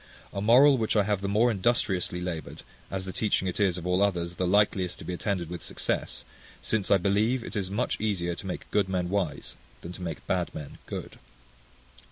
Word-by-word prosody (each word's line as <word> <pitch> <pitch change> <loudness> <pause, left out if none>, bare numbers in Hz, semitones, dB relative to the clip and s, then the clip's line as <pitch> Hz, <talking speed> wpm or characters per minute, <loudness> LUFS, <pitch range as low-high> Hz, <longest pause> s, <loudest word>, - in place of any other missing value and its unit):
A 100 - -2
moral 130 +5 +6
which 110 0 0
I 105 - +5
have 100 -1 0
the 100 - -2
more 110 +4 +3
industriously 95 -4 0
laboured, 85 -5 -5 0.3
as 95 -1 -3
the 95 - -5
teaching 105 -3 +1
it 90 - -3
is, 95 -4 +2
of 90 - -6
all 90 +1 +2
others, 90 -3 0
the 90 - 0
likeliest 95 -2 +2
to - - -10
be 90 - -3
attended 90 -1 -2
with 90 +1 -6
success; - - -2 0.3
since, 110 -3 -1
I 100 - +6
believe, 105 +6 +1
it - - -7
is 100 -3 -1
much 105 +3 -1
easier 90 -5 0
to 85 - -8
make 90 - -6
good 100 -2 +2
men 90 -2 -1
wise, 90 -7 -2 0.2
than 85 - -7
to 90 - -10
make 85 -3 -5
bad 90 -2 -1
men 75 -2 -8
good. - - -6
95 Hz, 210 wpm, -28 LUFS, 90-105 Hz, 0.3 s, moral